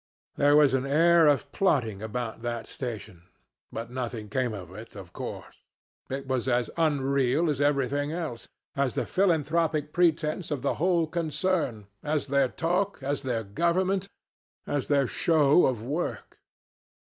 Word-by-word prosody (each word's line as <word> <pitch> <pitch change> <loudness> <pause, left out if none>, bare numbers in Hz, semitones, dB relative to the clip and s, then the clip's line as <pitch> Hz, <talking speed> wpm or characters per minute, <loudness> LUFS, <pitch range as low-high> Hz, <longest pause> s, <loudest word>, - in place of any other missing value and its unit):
There 145 +1 +4
was 150 -3 +5
an 135 +1 0
air 165 +3 +5
of 145 -2 +2
plotting 120 - +1
about 110 +1 -4
that 120 -1 -3
station, 110 -8 -7 0.4
but 115 +1 -6
nothing 120 -4 -4
came 125 +2 0
of 95 -4 -8
it, 110 +3 -11
of 95 -4 -10
course. - - -8 0.5
It 135 +1 -4
was 130 -1 -1
as 120 -1 +1
unreal 140 -1 +2
as 145 -1 -2
everything 145 0 +1
else 160 -8 -5 0.3
as 135 -3 0
the - - -1
philanthropic 165 -4 +1
pretense 165 -1 +1
of 145 -5 -3
the - - +1
whole 175 -2 +3
concern, 160 - -1 0.2
as 150 0 -1
their 140 -1 +2
talk, 180 +8 -1
as 140 +1 -1
their 120 -4 -2
government, 185 - 0 0.6
as 145 -2 -2
their 140 -2 +3
show 150 +3 +4
of 120 -4 -2
work. 150 +8 -4
140 Hz, 145 wpm, -27 LUFS, 120-160 Hz, 0.6 s, was